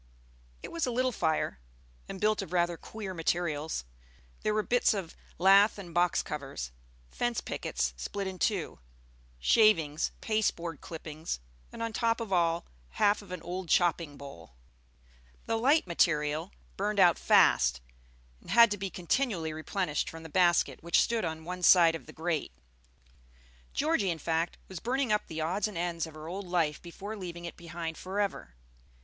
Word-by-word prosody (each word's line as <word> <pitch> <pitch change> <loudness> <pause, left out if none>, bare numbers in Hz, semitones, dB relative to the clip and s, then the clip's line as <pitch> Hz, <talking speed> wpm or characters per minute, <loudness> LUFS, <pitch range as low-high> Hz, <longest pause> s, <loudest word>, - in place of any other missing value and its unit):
It - - -7
was 330 -5 -1
a - - 0
little 255 +2 +1
fire, 160 - -1 0.5
and 190 - -6
built 215 +1 +2
of 195 - -7
rather 175 -1 +1
queer 200 +2 -7
materials. 160 - -1 0.6
There 215 - +1
were 215 - +1
bits 245 -1 +3
of 185 -5 -5 0.2
lath 195 +4 +6
and 180 -4 -9
box 175 +1 +2
covers, 135 - -5 0.4
fence 240 -1 -1
pickets - - -2
split 200 -1 -4
in 190 -1 -5
two, 200 -7 -1 0.6
shavings, 165 - +3
pasteboard 175 -7 -1
clippings, 160 - -6 0.3
and - - -5
on 230 -1 -3
top 230 +1 +1
of 220 -4 -3
all, 170 -1 +2 0.3
half 205 +1 +3
of 200 - -14
an 180 -2 -6
old 180 0 -5
chopping 170 -4 +2
bowl. 85 - -11 0.9
The 225 - 0
light 275 +8 +3
material 160 0 +1 0.3
burned 205 +1 -1
out 175 -3 +6
fast, - - +4 0.6
and - - -16
had 235 -2 +7
to 205 - -1
be 195 0 -3
continually 180 - -1
replenished 155 0 -2
from 165 0 -9
the 160 - -9
basket 175 +1 +3
which 170 +1 +3
stood 230 -1 +1
on 160 -1 -4
one 180 +1 -5
side 170 -2 +7
the - - -9
grate. 160 - -2 1.2
Georgie, 295 - +1
in 170 - -1
fact, 165 +2 -1
was 185 -3 -7
burning 255 - 0
up 210 - +1
the 160 0 -4
odds 185 +7 0
and 210 -5 -7
ends 170 -1 -2
of 160 - -12
her 155 0 -9
old 190 +3 -5
life 165 -4 0
before 195 +5 -7
leaving 175 -3 -7
it 170 - -6
behind 170 -1 -6
forever. 190 - -3
175 Hz, 165 wpm, -30 LUFS, 160-205 Hz, 1.2 s, had